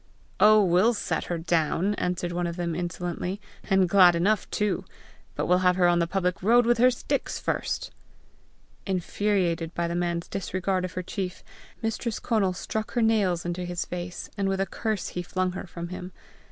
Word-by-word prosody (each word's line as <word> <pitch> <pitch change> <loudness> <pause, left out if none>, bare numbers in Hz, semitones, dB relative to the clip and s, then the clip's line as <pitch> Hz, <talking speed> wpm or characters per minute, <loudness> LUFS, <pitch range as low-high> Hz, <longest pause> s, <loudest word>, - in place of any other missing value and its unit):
"Oh, 215 0 +7
we'll 190 +6 +4
set 205 - -2
her 175 - -2
down," 165 +4 +1
answered 180 -2 -2
one 175 0 -1
of 170 - -4
them 170 -2 -2
insolently, 175 +2 -3
" - - -26
and 190 -2 +4
glad 180 -1 +6
enough 195 +4 +1
too! 210 -1 0 0.5
but - - -1
we'll 180 0 +4
have 180 -1 +3
her 180 -1 +4
on 175 0 +3
the 170 - +1
public 180 0 -1
road 235 +5 +5
with 240 0 +3
her 250 +2 +7
sticks 250 - -2
first!" - - -2 1.0
Infuriated 180 -3 0
by 170 0 0
the 170 - -3
man's 170 -1 -1
disregard 185 0 -2
of 185 - -7
her 185 - -3
chief, 185 0 -5 0.4
Mistress 225 0 -2
Conal 200 -5 +1
struck 215 +4 -4
her 240 - +2
nails 200 -6 +2
into 175 +1 -3
his 175 -1 -3
face, 175 0 -6
and 195 -1 +1
with 195 0 -1
a 195 - +2
curse 215 -1 -3
he 180 - -4
flung 185 +1 -1
her 185 - -6
from 170 0 -7
him. 180 0 -7
180 Hz, 190 wpm, -26 LUFS, 175-200 Hz, 1.0 s, Oh